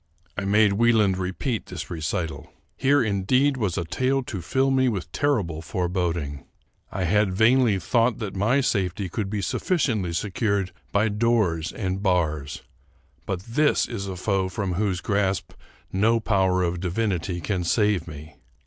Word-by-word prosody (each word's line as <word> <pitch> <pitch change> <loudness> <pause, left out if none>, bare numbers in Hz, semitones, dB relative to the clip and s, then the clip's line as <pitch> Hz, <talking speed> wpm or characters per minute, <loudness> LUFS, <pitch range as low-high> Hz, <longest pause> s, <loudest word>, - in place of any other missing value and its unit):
I 100 - -3
made 105 0 +4
Wieland 105 -3 +3
repeat 100 +6 -3
this 90 -3 -7
recital. 80 0 -3 0.2
Here 140 0 +3
indeed 115 +7 +2
was 105 -8 -1
a 85 - -1
tale 130 +9 0
to 105 -6 -5
fill 135 +9 +1
me 130 -1 +3
with 90 -8 -4
terrible 105 - 0
foreboding. 85 -4 -2 0.5
I 95 - -2
had 100 +2 +2
vainly 115 0 +4
thought 115 +5 +1
that 105 -3 -5
my 115 +8 +2
safety 95 -5 -1
could 100 +2 -3
be 100 -1 -2
sufficiently 110 - 0
secured 100 +1 -1 0.2
by 105 +2 +2
doors 105 -7 +1
and 95 -1 -3
bars, 80 -7 0 0.6
but 95 -2 -2
this 145 +7 +2
is 100 -5 -5
a 95 - -4
foe 95 0 0
from 95 0 -2
whose 95 -1 -1
grasp 100 -1 0 0.4
no 110 +4 +3
power 95 -4 +2
of 85 0 -1
divinity 90 -1 -1
can 90 0 -2
save 105 -2 +1
me! 75 -1 -10
100 Hz, 150 wpm, -24 LUFS, 90-110 Hz, 0.6 s, made